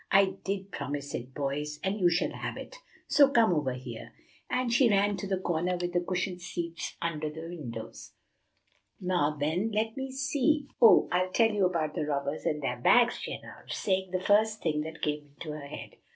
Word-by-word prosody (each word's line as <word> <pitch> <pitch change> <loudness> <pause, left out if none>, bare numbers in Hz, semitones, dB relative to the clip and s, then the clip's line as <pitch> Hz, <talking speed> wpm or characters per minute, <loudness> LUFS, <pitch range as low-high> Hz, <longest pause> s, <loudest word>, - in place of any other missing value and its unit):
"I 195 0 +5
did 195 0 -3
promise 145 0 -4
it, 125 +2 -6
boys, 150 +1 -2
and 195 +3 -1
you 180 -2 +5
shall 170 +1 +1
have - - -5
it, - - -9 0.3
so 280 -2 +6
come 230 -8 +4
over 145 -5 0
here;" 120 -2 -8 0.4
and 250 -2 0
she 240 0 +5
ran 205 0 +3
to 200 - -4
the 190 -1 0
corner 180 0 -1
with 175 0 -2
the 175 - +2
cushioned 180 0 -2
seats 170 -2 -5
under 155 -2 -2
the 160 +2 -7
windows. 120 -10 -8 0.9
"Now, 175 -5 0
then, 170 +9 0
let 220 +1 0
me 265 0 -4
see, 275 +2 +1
oh, 230 - +8
I'll 185 +1 +2
tell 225 +4 +3
you 200 -3 +3
about 160 -4 -1
the 150 - -2
Robbers 140 0 -2
and 150 -1 -1
their 125 -2 -2
Bags," 245 - +5
she - - -5
announced, - - -8
saying 190 -1 0
the 185 0 -1
first 215 +3 +2
thing 150 -2 +1
that 160 +1 -7
came 150 -1 -2
into 155 - -6
her 150 -2 -7
head. - - -8
175 Hz, 195 wpm, -29 LUFS, 150-205 Hz, 0.9 s, oh